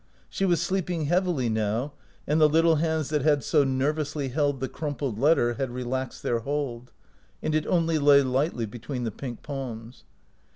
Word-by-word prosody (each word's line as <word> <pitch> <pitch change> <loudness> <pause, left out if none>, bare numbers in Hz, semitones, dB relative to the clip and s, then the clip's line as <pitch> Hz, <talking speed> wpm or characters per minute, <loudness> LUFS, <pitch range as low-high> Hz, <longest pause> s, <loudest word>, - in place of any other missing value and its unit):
She 195 - -1
was 175 -3 +2
sleeping 175 -2 -1
heavily 175 -5 +1
now, 110 +5 -1 0.3
and 155 +2 +1
the 155 - +7
little 165 +1 +4
hands 160 -2 0
that 150 -1 0
had 145 -1 +2
so 150 -3 +3
ner 135 +2 +1
vously 150 -3 -3
held 145 0 0
the 130 - -2
crumpled 140 -8 -4
letter 140 -4 +3
had 130 +2 -3
relaxed 125 +1 -4
their 120 - 0
hold, 125 -2 -4 0.5
and 155 - 0
it 155 0 0
only 165 -3 +2
lay 140 -1 +6
lightly 130 -1 0
between 125 +4 -6
the 115 - -2
pink 120 +2 -7
palms. 125 -4 -7
140 Hz, 175 wpm, -26 LUFS, 125-155 Hz, 0.5 s, the